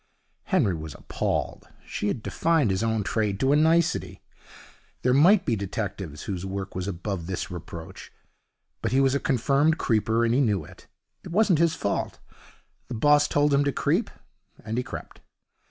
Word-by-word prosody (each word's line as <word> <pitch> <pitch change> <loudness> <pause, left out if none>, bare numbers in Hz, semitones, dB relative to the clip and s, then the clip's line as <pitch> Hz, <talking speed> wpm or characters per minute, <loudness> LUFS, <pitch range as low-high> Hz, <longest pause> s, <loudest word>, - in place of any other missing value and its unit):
Henry 95 - +2
was 80 -3 -7
appalled. - - -3 0.2
She 105 - -3
had 110 +1 -2
defined 160 -10 +1
his 95 - 0
own 110 -2 0
trade 105 -1 -1
to 135 - +2
a - - +5
nicety. 165 +3 +2 0.8
There 125 - +3
might 180 +8 +5
be 115 - +1
detectives 100 -6 -5
whose 95 -4 -4
work 95 0 -5
was 95 +1 -4
above 95 -2 -4
this 95 -1 -4
reproach, 85 -2 -9 0.7
but - - -1
he 130 - +3
was 135 -1 +3
a 140 - +1
confirmed 140 +5 +2
creeper, 110 0 +1
and 115 - +1
he 135 - +3
knew 105 - +1
it. - - -16 0.4
It - - -9
wasn't 185 -2 +3
his 170 -1 +3
fault. 100 - -2 0.7
The 125 - -5
boss 145 +5 +4
told 145 0 +2
him 140 +1 +4
to 140 - +1
creep, - - 0 0.6
and 110 0 -3
he - - -1
crept. - - -9
115 Hz, 170 wpm, -26 LUFS, 95-145 Hz, 0.8 s, a